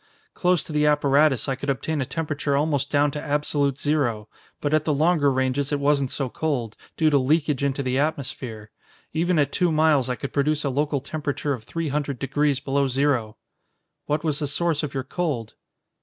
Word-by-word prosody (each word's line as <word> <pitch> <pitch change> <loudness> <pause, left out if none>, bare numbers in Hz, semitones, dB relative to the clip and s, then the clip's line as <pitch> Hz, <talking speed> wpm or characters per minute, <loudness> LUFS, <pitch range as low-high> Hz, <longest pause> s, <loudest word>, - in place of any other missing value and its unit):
Close 180 -2 +2
to 155 - -8
the 150 0 +3
apparatus, 145 -2 +3
I 135 - +1
could 135 +2 -5
obtain 145 +2 -1
a 130 - -2
temperature 150 -3 -1
almost 145 -2 0
down 145 0 +2
to 150 - -5
absolute 145 -2 0
zero, 130 -9 0 0.3
but 145 0 -1
at 155 -1 +3
the 155 - +1
longer 155 -1 +3
ranges 130 +2 0
it 145 - 0
wasn't 140 -2 +2
so 135 0 -1
cold, 125 -5 -2 0.2
due 155 -1 +3
to 140 - +4
leakage 145 +1 +1
into 140 0 0
the 130 +1 0
atmosphere. 130 -7 -3 0.4
Even 170 +2 +1
at 145 -2 +2
two 180 -3 +1
miles 155 -4 +3
I 125 - 0
could 140 - -6
produce 150 +1 +1
a 140 - 0
local 145 +1 0
temperature 145 0 -3
of 115 -5 -7
three 165 +3 -3
hundred 140 -1 -2
degrees 140 +1 0
below 140 0 0
zero." 130 -5 0 0.7
"What 150 +1 0
was 150 -3 0
the 145 - -1
source 160 +1 0
of 145 -3 -5
your 135 - -1
cold?" 135 -7 -3
145 Hz, 195 wpm, -24 LUFS, 135-150 Hz, 0.7 s, to